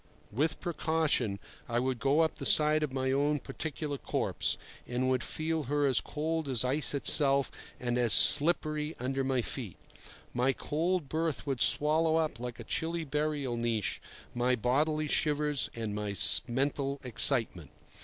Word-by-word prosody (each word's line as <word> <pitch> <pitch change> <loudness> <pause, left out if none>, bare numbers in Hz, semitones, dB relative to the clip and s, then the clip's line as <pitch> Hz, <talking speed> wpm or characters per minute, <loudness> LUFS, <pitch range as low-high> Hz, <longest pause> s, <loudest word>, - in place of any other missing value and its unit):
With 150 +8 -2
precaution 160 - -1 0.3
I 120 - -2
would 130 0 -2
go 140 +6 +1
up 160 - -1
the - - -7
side 155 0 +3
of 150 -3 -3
my 130 0 -2
own 145 +2 0
particular 150 -2 -6
corpse, - - -2 0.3
and 130 +1 -1
would 130 -1 -1
feel 160 -1 -3
her 145 +2 -1
as 135 -3 +3
cold 160 0 -4
as 125 -1 +2
ice 140 +3 +2
itself 140 -1 +5 0.3
and 120 0 -2
as 120 -2 +1
slippery 155 +1 +5
under 135 +2 -3
my 130 -2 -1
feet. 115 -9 -6 0.6
My 125 +2 0
cold 165 +3 -2
berth 160 -1 -3
would 135 -4 -3
swallow 155 +2 +3
up 155 -7 -2
like 125 0 -7
a - - -7
chilly 165 +8 -3
burial 150 -3 -3
niche 115 -3 -2 0.3
my 125 +1 0
bodily 150 +6 -1
shivers 150 -1 -1
and 110 -3 -5
my 105 -1 -4 0.3
mental 140 +2 -2
excitement. 115 - +3
140 Hz, 155 wpm, -29 LUFS, 125-155 Hz, 0.6 s, itself